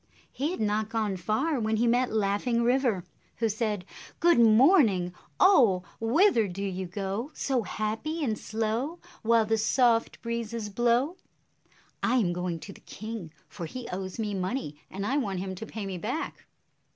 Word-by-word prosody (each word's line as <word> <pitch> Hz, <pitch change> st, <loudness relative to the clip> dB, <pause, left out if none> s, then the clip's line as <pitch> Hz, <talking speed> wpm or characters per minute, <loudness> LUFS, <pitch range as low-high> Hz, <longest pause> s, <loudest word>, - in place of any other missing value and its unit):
He 285 Hz, +4 st, -1 dB
had 365 Hz, -, -4 dB
not 215 Hz, 0 st, 0 dB
gone 220 Hz, -4 st, -1 dB
far 220 Hz, -, 0 dB
when 220 Hz, -1 st, 0 dB
he 230 Hz, +2 st, +2 dB
met 245 Hz, +2 st, +2 dB
Laughing 220 Hz, +3 st, +1 dB
River, 240 Hz, -6 st, +2 dB, 0.3 s
who 225 Hz, -, 0 dB
said, 210 Hz, -3 st, -2 dB, 0.3 s
"Good 340 Hz, -7 st, +5 dB
morning, 225 Hz, -, +5 dB, 0.3 s
oh! 235 Hz, -, +5 dB, 0.2 s
Whither 235 Hz, -, +4 dB
do 190 Hz, +2 st, -5 dB
you 190 Hz, -1 st, -3 dB
go, 195 Hz, +7 st, -3 dB
So 265 Hz, -3 st, 0 dB
happy 225 Hz, +10 st, -3 dB
and 225 Hz, -6 st, 0 dB
slow, 225 Hz, +9 st, -2 dB, 0.2 s
While 230 Hz, 0 st, +4 dB
the 225 Hz, +1 st, +1 dB
soft 230 Hz, +1 st, +2 dB
breezes 230 Hz, -2 st, -3 dB
blow?" 240 Hz, -, +1 dB, 0.8 s
"I 245 Hz, -, +2 dB
am 195 Hz, -9 st, +2 dB
going 175 Hz, -1 st, -3 dB
to 195 Hz, -, -9 dB
the -, -, -17 dB
king, 215 Hz, -6 st, -7 dB, 0.2 s
for 170 Hz, -5 st, -7 dB
he 250 Hz, +6 st, -7 dB
owes 185 Hz, 0 st, -5 dB
me 215 Hz, -2 st, -2 dB
money, 185 Hz, -, -3 dB
and 195 Hz, +1 st, -4 dB
I 270 Hz, +6 st, +1 dB
want 200 Hz, -9 st, -1 dB
him 190 Hz, +1 st, -3 dB
to 220 Hz, +4 st, -7 dB
pay 220 Hz, -2 st, -5 dB
me 190 Hz, -2 st, -4 dB
back." 250 Hz, -, -4 dB
220 Hz, 165 wpm, -28 LUFS, 195-245 Hz, 0.8 s, Good